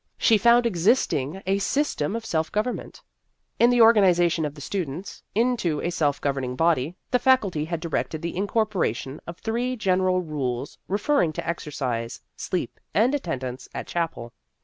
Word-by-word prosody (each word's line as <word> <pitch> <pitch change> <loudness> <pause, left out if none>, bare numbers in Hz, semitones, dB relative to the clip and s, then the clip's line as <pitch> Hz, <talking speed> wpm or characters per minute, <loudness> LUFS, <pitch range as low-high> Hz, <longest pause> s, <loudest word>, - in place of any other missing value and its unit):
She 225 -4 +4
found 235 +3 +5
existing 185 - +1
a 195 +1 +1
system 205 - 0
of 230 -1 -4
self 160 -1 -1
government. 215 +4 -3 0.6
In 235 - +6
the 245 -1 +4
organ 225 -2 +7
ization 175 -3 +3
of 145 - -9
the - - -11
students 170 +2 -5
into 225 -9 +1
a 175 - -2
self 150 -5 0
govern 140 -2 -1
ing 125 0 -3
body, 160 +1 +1 0.2
the 250 - +3
Faculty 210 - +2
had 170 0 -3
directed 160 -2 -3
the 170 - -3
incorporation 190 - -1
of 170 0 -7
three 240 +4 -2
general 185 -4 +2
rules 135 -4 -4
refer 215 +9 +1
ring 160 -2 +2
to - - -5
exercise, 130 -8 -3 0.2
sleep, 180 - -3 0.2
and 235 +6 +4
attendance 130 - -4
at - - -4
chapel. 165 -9 -3
175 Hz, 165 wpm, -25 LUFS, 150-220 Hz, 0.6 s, organ